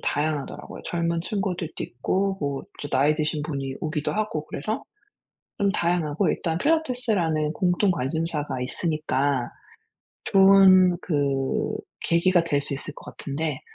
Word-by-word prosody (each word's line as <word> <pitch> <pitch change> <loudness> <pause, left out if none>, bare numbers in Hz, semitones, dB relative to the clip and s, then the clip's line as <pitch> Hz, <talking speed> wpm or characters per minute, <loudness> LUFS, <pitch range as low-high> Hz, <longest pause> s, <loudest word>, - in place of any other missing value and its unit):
다양하더라고요. 150 -1 -3
젊은 170 -1 -1
친구들도 185 -4 -3
있고 190 +10 -1
뭐 140 -2 -2 0.2
또 145 - -4
나이 145 +3 +3
드신 155 0 -1
분이 135 -3 -4
오기도 155 -2 -2
하고 210 -8 -2
그래서 215 +11 -3 0.8
좀 200 -1 +3
다양하고 170 -2 +1
일단 165 -1 -1
필라테스라는 215 - +1
공통 185 +2 +2
관심사가 150 -2 -2
있으니까 140 -2 0 0.8
좋은 190 -2 +6
그 140 -4 0 0.3
계기가 170 +1 +3
될 145 -4 +1
수 140 - +1
있을 145 +2 -4
것 - - -12
같은데 150 0 -3
160 Hz, 295 characters per minute, -25 LUFS, 145-185 Hz, 0.8 s, 좋은